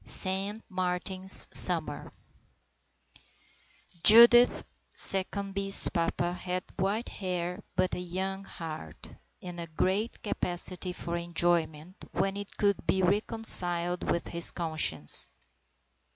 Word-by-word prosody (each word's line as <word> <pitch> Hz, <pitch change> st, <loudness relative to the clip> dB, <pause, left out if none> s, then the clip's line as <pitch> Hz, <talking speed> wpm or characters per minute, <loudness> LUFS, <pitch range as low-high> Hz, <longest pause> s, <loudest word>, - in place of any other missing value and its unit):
SAINT 195 Hz, +3 st, -5 dB
MARTIN'S 185 Hz, 0 st, +6 dB
SUMMER 160 Hz, -5 st, +3 dB, 1.0 s
I -, -, -21 dB, 0.8 s
JUDITH 235 Hz, +2 st, +5 dB, 0.3 s
SECCOMBE'S 195 Hz, 0 st, +2 dB
papa 175 Hz, 0 st, -4 dB
had 180 Hz, 0 st, -7 dB
white 200 Hz, +5 st, -4 dB
hair 180 Hz, 0 st, -7 dB
but 185 Hz, -1 st, -2 dB
a -, -, -5 dB
young 190 Hz, +2 st, -7 dB
heart, 155 Hz, -, -12 dB, 0.3 s
and 175 Hz, -1 st, -10 dB
a 170 Hz, -, -8 dB
great 190 Hz, +8 st, -5 dB
capacity 180 Hz, -3 st, -4 dB
for 170 Hz, -1 st, -8 dB
enjoyment 170 Hz, 0 st, -4 dB, 0.2 s
when 195 Hz, 0 st, -4 dB
it 205 Hz, 0 st, -11 dB
could 200 Hz, -1 st, -3 dB
be 190 Hz, -, -2 dB
reconciled 180 Hz, -3 st, 0 dB
with 170 Hz, -, -4 dB
his 170 Hz, 0 st, +1 dB
conscience. 155 Hz, -, -1 dB
180 Hz, 105 wpm, -26 LUFS, 170-195 Hz, 1.0 s, MARTIN'S